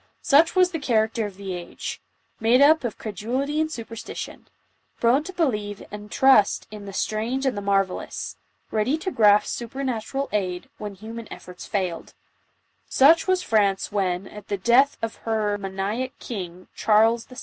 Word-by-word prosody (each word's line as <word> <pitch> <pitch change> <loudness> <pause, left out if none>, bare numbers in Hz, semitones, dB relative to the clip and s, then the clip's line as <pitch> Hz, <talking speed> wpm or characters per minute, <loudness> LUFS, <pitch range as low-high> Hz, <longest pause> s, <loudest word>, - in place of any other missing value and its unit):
Such 320 +4 +5
was 365 -1 +4
the 325 - -3
character 225 -4 +1
of 200 - -11
the_ager^mad» 200 +5 -3
up 315 -1 +4
of 235 -3 -3
cre 220 - -6
dulity 260 - -1
and 315 0 -1
superstition 230 -4 -7 0.3
— - - -42
prone 245 +5 +3
to 375 - -6
believe 210 - -1
jind 210 0 -8
trust 265 -6 +4
in 210 -1 -8
the" - - -6
8irang6"a"n<rtlie 225 +3 -1
marvellous 195 -2 -1 0.2
— - - -42
ready 225 +8 +1
to 375 +4 -4
grasp 210 -4 +5
super 245 +3 -5
natural 260 +2 -2
aicl^when 195 +1 -4
human 225 +2 -8
efforts 180 0 -10
foiled; 185 -5 -3 0.4
— - - -45
such 320 +6 +5
was 370 -1 +2
Franc 205 -3 +3 0.6
at 210 -1 -10
the 200 - -2
death 240 +8 +4
of 225 - -3
her 215 -2 -1
maniac 200 +6 -3
king, 185 -5 -7
Charles 225 +2 +3
VI. 255 - -14
220 Hz, 155 wpm, -24 LUFS, 205-265 Hz, 0.6 s, Such